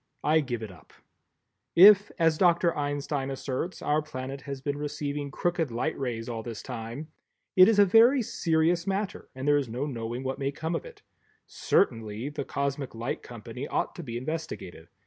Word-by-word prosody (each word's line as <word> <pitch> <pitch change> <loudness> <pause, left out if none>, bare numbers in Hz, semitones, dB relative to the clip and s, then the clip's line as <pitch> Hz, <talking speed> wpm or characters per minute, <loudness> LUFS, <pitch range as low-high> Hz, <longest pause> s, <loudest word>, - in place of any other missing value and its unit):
I 155 +1 +4
give 120 -6 -3
it 105 - -6
up. 80 -4 -18 0.8
If, 200 +3 +8
as 165 -3 +2
Dr. 175 -2 +4
Einstein 145 -1 -2
asserts, 135 +6 -4
our 150 +1 +2
planet 135 -2 -6
has 140 -1 -4
been 145 +2 -3
receiving 145 -1 -3
crooked 170 +1 -1
light 120 +7 -2
rays 120 -4 -3
all 115 -2 -4
this 115 -1 -7
time, 125 +5 -6 0.5
it 185 0 +9
is 220 - +3
a 205 - +7
very 235 +6 +6
serious 165 -1 +1
matter 195 +1 -3
and 130 +2 -5
there 145 0 +5
is 140 -4 -2
no 125 +5 -2
knowing 120 -2 -4
what 135 +1 -3
may 140 0 -1
come 160 +4 -4
of - - -3
it; 485 - -13 0.4
certainly 115 - 0
the 150 -1 -4
Cosmic 140 -2 -3
Light 115 +3 -3
Company 120 +3 -8
ought - - -1
to - - -8
be 120 -7 -5
investigated. 130 - -6
140 Hz, 180 wpm, -28 LUFS, 125-165 Hz, 0.8 s, it